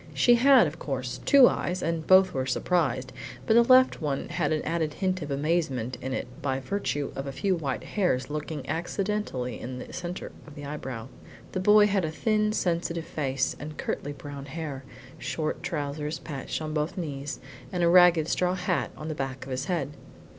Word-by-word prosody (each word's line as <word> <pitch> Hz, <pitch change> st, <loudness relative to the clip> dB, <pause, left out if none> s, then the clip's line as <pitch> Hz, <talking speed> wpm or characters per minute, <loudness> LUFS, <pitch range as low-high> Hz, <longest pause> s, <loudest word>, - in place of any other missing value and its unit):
She 240 Hz, -, +5 dB
had, 255 Hz, -1 st, +6 dB
of 155 Hz, +2 st, -5 dB
course, 130 Hz, -3 st, -4 dB
two 275 Hz, -3 st, +8 dB
eyes, 180 Hz, +1 st, -1 dB
and 165 Hz, -1 st, -2 dB
both 185 Hz, 0 st, +6 dB
were 130 Hz, -1 st, -1 dB
surprised, 130 Hz, -3 st, 0 dB, 0.3 s
but -, -, +3 dB
the 235 Hz, -, +7 dB
left 255 Hz, -1 st, +5 dB
one 145 Hz, -3 st, -2 dB
had 155 Hz, -4 st, 0 dB
an 155 Hz, -1 st, 0 dB
added 160 Hz, -2 st, -1 dB
hint 185 Hz, -1 st, -1 dB
of 150 Hz, -, -5 dB
amazement 140 Hz, -4 st, 0 dB
in 130 Hz, -, -4 dB
it -, -, -2 dB, 0.2 s
by 135 Hz, -1 st, -1 dB
virtue 145 Hz, -3 st, -2 dB
of 135 Hz, +1 st, -4 dB
a -, -, -3 dB
few 195 Hz, +8 st, 0 dB
white 140 Hz, -6 st, -3 dB
hairs 180 Hz, -11 st, 0 dB
lurking 150 Hz, +1 st, -5 dB
accidentally 175 Hz, -, -2 dB
in 125 Hz, +1 st, -6 dB
the 125 Hz, -, -8 dB
centre 180 Hz, 0 st, -5 dB, 0.2 s
of 150 Hz, -, -12 dB
the 145 Hz, -, -8 dB
eyebrow. 130 Hz, -6 st, -5 dB, 0.4 s
The 185 Hz, -, -2 dB
boy 210 Hz, +2 st, +6 dB
had 200 Hz, -2 st, +1 dB
a 160 Hz, -, 0 dB
thin 215 Hz, +6 st, +1 dB
sensitive 170 Hz, -4 st, -1 dB
face 135 Hz, -3 st, -1 dB
and 150 Hz, +1 st, -7 dB
curtly 145 Hz, -, -3 dB
brown 145 Hz, -1 st, -8 dB
hair, 145 Hz, -2 st, -5 dB, 0.4 s
short 155 Hz, -2 st, -3 dB
trousers 150 Hz, 0 st, -3 dB
patched 145 Hz, +1 st, -5 dB
on 155 Hz, 0 st, -4 dB
both 150 Hz, +3 st, -1 dB
knees, 145 Hz, -5 st, -4 dB, 0.3 s
and 180 Hz, -1 st, -1 dB
a -, -, +5 dB
ragged 175 Hz, -2 st, +6 dB
straw 180 Hz, +1 st, +1 dB
hat 180 Hz, -1 st, -1 dB
on 155 Hz, -, -6 dB
the 160 Hz, -, -2 dB
back 135 Hz, -3 st, -4 dB
of 135 Hz, -, -8 dB
his 130 Hz, 0 st, -2 dB
head. 165 Hz, -6 st, -1 dB
155 Hz, 190 wpm, -27 LUFS, 140-180 Hz, 0.4 s, two